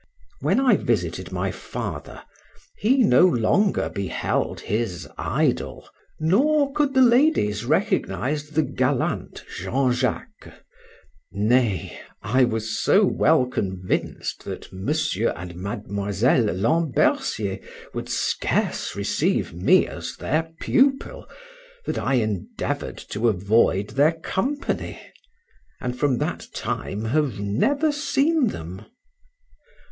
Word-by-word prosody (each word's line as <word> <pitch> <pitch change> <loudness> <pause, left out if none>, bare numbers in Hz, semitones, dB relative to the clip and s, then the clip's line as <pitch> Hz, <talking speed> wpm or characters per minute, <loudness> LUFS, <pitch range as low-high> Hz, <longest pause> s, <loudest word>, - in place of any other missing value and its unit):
When - - +2
I 270 -2 +4
visited - - -2
my - - -1
father, - - -6 0.6
he 255 +5 +3
no 125 - +5
longer 180 - +2
beheld 100 -2 -2
his 105 -5 -2
idol, - - -1 0.3
nor 275 - +3
could 290 -2 +1
the 260 - +7
ladies 235 - +3
recognize 150 - 0
the 155 +1 +1
gallant 130 -1 -1
Jean 130 0 0
Jacques; 125 -1 -3 0.8
nay, 105 -1 +1 0.2
I 125 +6 +3
was 110 -2 -2
so - - +5
well 125 - +3
convinced 95 -7 -3
that - - -7
Mr. 110 - 0
and 85 0 -8
Miss 100 +1 -4
Lambercier 125 - +2 0.3
would - - -5
scarce - - -1
receive - - 0
me 90 +2 +4
as - - -7
their 160 +3 -1
pupil, 270 +1 +1 0.6
that - - -2
I 135 - +1
endeavored 110 -7 -2
to 115 +3 +1
avoid 100 0 +2
their 145 +4 +3
company, 195 - -3 0.8
and 125 -1 -3
from 135 -1 +1
that - - -3
time 105 +3 -3
have 135 -3 0
never 275 - +1
seen 290 0 +1
them. 85 - -7
125 Hz, 105 wpm, -23 LUFS, -, 0.8 s, the